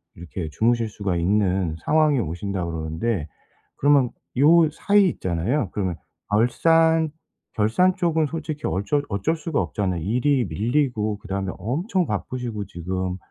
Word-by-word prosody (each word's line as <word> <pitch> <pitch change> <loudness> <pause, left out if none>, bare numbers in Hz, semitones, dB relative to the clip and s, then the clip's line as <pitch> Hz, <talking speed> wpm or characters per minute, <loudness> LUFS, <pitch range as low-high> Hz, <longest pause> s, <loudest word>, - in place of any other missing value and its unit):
이렇게 85 -1 -6
주무실 115 +4 +1
수가 100 -4 -2
있는 95 -2 +1
상황이 155 -3 +3
오신다 95 0 -3
그러는데, 80 +3 -2 0.5
그러면 140 -3 +4 0.3
요 160 +3 +6
사이 200 +5 +3
있잖아요. 95 - -1
그러면 95 -4 -1 0.4
결산 160 +8 +3 0.5
결산 145 - +3
쪽은 160 -3 +1
솔직히 155 -1 -5
어쩔 140 +10 0
어쩔 100 - 0
수가 160 -2 -1
없잖아요. 95 -5 -2
일이 125 - +1
밀리고 110 -2 0
그다음에 100 -2 -3
엄청 175 - -1
바쁘시고 110 0 -4
지금 95 +1 -3
110 Hz, 310 characters per minute, -23 LUFS, 95-150 Hz, 0.5 s, 요